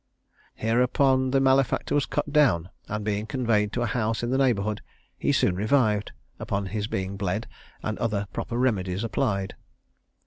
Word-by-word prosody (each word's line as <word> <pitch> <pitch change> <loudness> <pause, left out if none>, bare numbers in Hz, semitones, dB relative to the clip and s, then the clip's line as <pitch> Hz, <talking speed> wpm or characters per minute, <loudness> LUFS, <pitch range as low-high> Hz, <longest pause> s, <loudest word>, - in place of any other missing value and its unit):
Hereupon 130 +3 +2
the 135 +1 +3
malefactor 135 0 +2
was 145 -2 +2
cut 145 - -2
down, 100 - +3 0.2
and, 105 0 -4
being 105 0 -1
conveyed 110 -4 +1
to 120 - 0
a - - +1
house 115 0 -1
in 120 - -1
the 130 - +2
neighbourhood, 110 -6 +1 0.3
he - - 0
soon 90 - +2
revived, 105 0 +2 0.3
upon 100 0 -2
his 105 +2 -3
being 95 -1 -3
bled, 100 +2 -2 0.4
and 110 -1 -3
other 105 -3 -1
proper 120 - -3
remedies 100 -6 0
applied. 100 -5 -1
110 Hz, 160 wpm, -26 LUFS, 100-130 Hz, 0.4 s, the